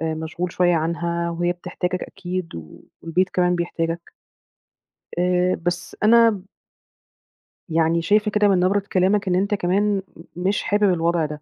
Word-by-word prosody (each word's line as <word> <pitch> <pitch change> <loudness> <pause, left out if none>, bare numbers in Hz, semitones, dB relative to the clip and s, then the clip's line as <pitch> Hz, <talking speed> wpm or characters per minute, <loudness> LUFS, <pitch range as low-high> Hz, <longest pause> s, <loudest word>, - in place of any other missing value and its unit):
آآ 160 0 -1
مشغول 165 +2 -4
شوية 175 -1 +2
عنها 170 +1 -1
وهي 175 +1 0
بتحتاجك 180 0 -4
أكيد 185 -2 -5
و 80 -2 -10 0.2
والبيت 180 +3 0
كمان 180 -1 +1
بيحتاجك. 170 -1 -3 1.1
آآ 180 0 +2
بس 175 0 -4
أنا 225 -3 +5 1.3
يعني 165 +1 +2
شايفة 210 +4 +2
كده 210 0 +3
من 190 -3 +3
نبرة 190 +3 +2
كلامك 195 +2 +2
إن 180 - +2
أنت 200 +3 0
كمان 200 +3 +1 0.4
م 175 - -7
مش 200 - 0
حابب 205 -2 +2
الوضع 170 -1 +1
ده، 150 0 -7
180 Hz, 145 wpm, -22 LUFS, 170-195 Hz, 1.3 s, أنا